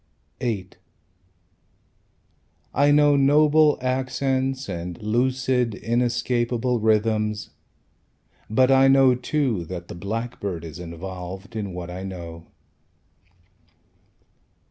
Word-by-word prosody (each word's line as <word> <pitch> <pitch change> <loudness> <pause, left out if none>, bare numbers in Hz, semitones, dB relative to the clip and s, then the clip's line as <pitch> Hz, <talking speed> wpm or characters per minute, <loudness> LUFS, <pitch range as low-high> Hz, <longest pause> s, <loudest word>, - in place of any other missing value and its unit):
VIII 105 -7 -2 2.0
I 145 +1 +3
know 145 0 +5
noble 150 +2 +4
accents 130 +1 -1
And 90 -2 -5
lucid, 125 +1 0
inescapable 120 +1 0
rythms; 110 -1 +1 1.0
But 130 +4 +3
I 135 0 +6
know, 135 -1 +6
too, 125 - -1
That 85 0 -7
the - - -6
blackbird 100 -3 -4
is 80 +1 -9
involved 90 +4 -8
In 100 -3 -3
what 90 -1 -6
I 90 +1 -6
know. 85 -3 -8
115 Hz, 90 wpm, -24 LUFS, 95-130 Hz, 2.0 s, I